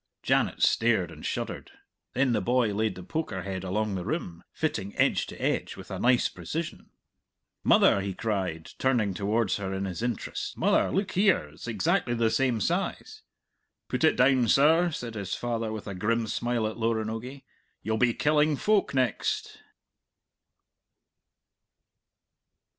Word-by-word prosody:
Janet - - +1
stared 110 -6 +3
and - - -12
shuddered. - - -4 0.4
Then 130 0 +2
the - - +1
boy 120 -3 +2
laid 110 -1 0
the 90 - -9
poker 100 - -3
head 95 -1 -4
along 105 +3 -1
the 95 -2 -3
rim, 90 - -4
fitting 100 +1 -3
edge - - +2
to - - -10
edge - - -1
with - - -11
a - - -4
nice 125 0 +3
precision. 165 +1 -6 0.7
"Mother," 100 - +5
he 95 -1 -4
cried, 95 -7 -3
turning 120 -7 +2
towards 105 +5 0
her 95 -2 -4
in 95 +1 -2
his 95 +2 -5
interest, 120 -3 -3
"mother, - - +3
look 195 +1 -1
here! 190 - +2
It's 75 +10 -11
exactly 115 +2 +1
the 115 -1 +2
same 125 -4 +1
size!" - - -2 0.7
"Put - - -1
it - - +5
down, 130 -1 +4
sir," 160 +8 +5
said 120 -7 -5
his 100 -4 -3
father 115 -2 -2
with 110 -1 -6
a 100 - -5
grim 115 +5 0
smile 120 +1 -1
at 110 +1 -3
Loranogie. 115 +3 -2 0.4
"You'll 110 0 0
be 120 0 +2
killing 150 0 +3
folk 205 -1 +1
next." 125 -4 -1
115 Hz, 150 wpm, -27 LUFS, 100-130 Hz, 0.7 s, Mother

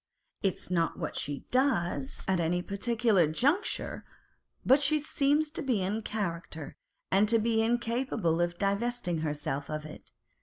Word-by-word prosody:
It 195 -2 +1
is - - -9
not 170 -2 +1
what - - -4
she 145 -1 -3
does 175 - +1
at 190 -2 +2
any 175 +2 0
particular 215 -3 +2
juncture, 280 - 0 0.6
but 270 +3 +6
she 300 +2 +3
seems 295 +1 +1
to - - -3
be 225 -9 0
the 215 +3 -1
character, 170 -8 -4 0.4
and 200 +2 +4
to 230 - +5
be 225 0 +2
incapable 230 -6 0
of 175 0 -1
divesting 200 -3 0
herself 145 -2 -3
of 155 0 -4
it. 155 - -11
200 Hz, 150 wpm, -30 LUFS, 165-240 Hz, 0.6 s, but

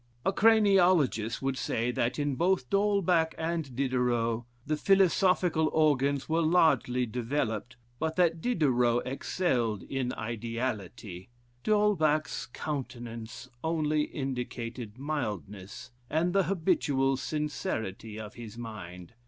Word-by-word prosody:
A 195 - +2
craniologist 185 - +4
would 135 -1 -1
say 115 +2 -1
that 120 0 -1
in 145 -1 0
both 170 -2 +1
D'Holbach 195 -5 +2
and 160 -5 -3
Diderot, 120 -3 0 0.2
the 155 - 0
philosophical 180 -3 +3
organs 140 -3 +2
were 165 +1 +1
largely 155 -7 +3
developed, 120 +1 -2 0.2
but 160 0 -1
that 170 -3 +2
Diderot 125 - +2
excelled 125 - -1
in 130 -2 -2
ideality; 110 -4 -4 0.4
D'Holbach's 180 -8 +2
countenance 120 -4 -6 0.2
only 155 -2 +1
indicated 125 -4 -5
mildness, 105 - -5 0.2
and 165 +4 +1
the 195 -2 +3
habitual 155 -7 +1
sincerity 125 - -3
of 110 -1 -8
his 115 -1 -9
mind. 105 -6 -8
135 Hz, 105 wpm, -29 LUFS, 115-160 Hz, 0.4 s, craniologist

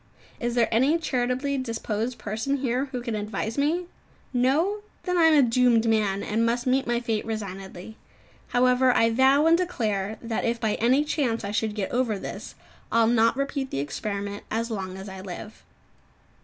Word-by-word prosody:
Is 240 0 -2
there 235 -2 +3
any 265 +8 +3
charitably 265 -2 -1
disposed 230 -1 -3
person 220 +6 -2
here 255 0 0
who 255 -3 -6
can 235 -2 -3
advise 215 +1 -3
me? 315 +5 +1 0.5
No? 305 +12 +2 0.2
Then 360 -1 -1
I 340 -2 +5
am 320 -1 +6
a 275 -4 +5
doomed 235 -1 +3
man, 210 -3 +1
and 220 +2 0
must 235 +1 0
meet 265 +1 +1
my 240 0 +1
fate 225 -3 -2
resignedly. 195 -1 -6 0.5
However, 250 +1 +3
I 230 0 +4
vow 265 +5 +4
and 330 +1 +6
declare 220 - -1
that 230 -1 -3
if 235 0 0
by 220 -2 0
any 255 +5 +4
chance 250 -7 -1
I 200 - -3
should 215 0 -1
get 205 -3 -3
over 240 -4 0
this, - - -7 0.4
I'll 230 0 +4
not 230 +1 +3
repeat 275 -1 -2
the - - -4
experiment 200 +8 -4
as 230 +1 -2
long 190 -3 -4
as 190 +1 -8
I 190 -1 -8
live. 195 +3 -9
235 Hz, 180 wpm, -25 LUFS, 215-265 Hz, 0.5 s, am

